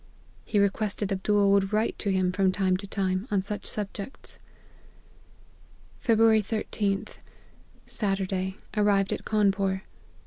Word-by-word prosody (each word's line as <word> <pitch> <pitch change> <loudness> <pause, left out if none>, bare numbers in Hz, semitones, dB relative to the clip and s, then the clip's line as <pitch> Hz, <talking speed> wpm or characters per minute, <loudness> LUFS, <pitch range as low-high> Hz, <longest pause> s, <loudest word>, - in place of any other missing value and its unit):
He 210 - -1
requested 200 0 0
Abdool 200 +1 +2
would 200 0 +3
write 215 +1 +1
to 200 - 0
him, 185 -1 +2
from 190 0 +2
time 185 -1 +1
to 200 +1 -8
time, 190 +1 -1
on 200 -2 +1
such 205 +1 -5
subjects. 205 +4 -6 0.8
" - - -29
Feb. 230 -3 +3
13th. 215 -2 +1 0.7
Saturday, 190 -2 -2 0.2
arrived 205 -2 +3
at - - -6
Cawnpore. 195 -2 +1
200 Hz, 125 wpm, -27 LUFS, 190-210 Hz, 0.8 s, would